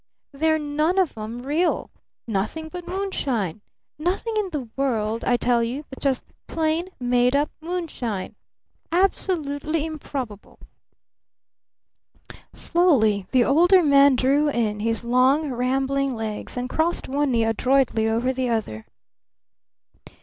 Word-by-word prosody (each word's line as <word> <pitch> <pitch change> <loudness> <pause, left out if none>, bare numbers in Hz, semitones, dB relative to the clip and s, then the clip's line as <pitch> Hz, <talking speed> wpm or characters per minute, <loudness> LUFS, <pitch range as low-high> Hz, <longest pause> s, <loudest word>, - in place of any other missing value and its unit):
They're 315 +2 +1
none 305 +4 0
of 375 -4 +2
'em 225 +3 -6
real! 310 +6 0 0.3
Nothing 225 +10 -3
but 355 +1 -8
moonshine! 265 - -2 0.4
Nothing 370 +8 -1
in 420 -3 0
the 290 -8 -4
world, 230 -5 -1
I 245 - +2
tell 240 0 +2
you, 250 +6 -3
but 265 - -9
just 270 -3 0 0.2
plain 325 +2 -1
made 245 +1 +2
up 290 +1 +1
moonshine! 315 - -4 0.6
Absolutely 325 -4 0
improbable!" 270 -9 -6 2.0
Slowly 220 - +2
the 250 -2 +3
Older 350 +6 +5
Man 280 -2 +6
drew 275 +4 +2
in 220 -6 -1
his 225 +1 0
long, 260 +5 +3
rambling 265 +2 0
legs 220 +1 -5
and 245 0 -2
crossed 320 +5 -1
one 285 +2 0
knee 235 -3 +2
adroitly 230 0 +2
over 240 +4 0
the 255 -1 -1
other. 205 - -3
270 Hz, 120 wpm, -23 LUFS, 235-315 Hz, 2.0 s, Man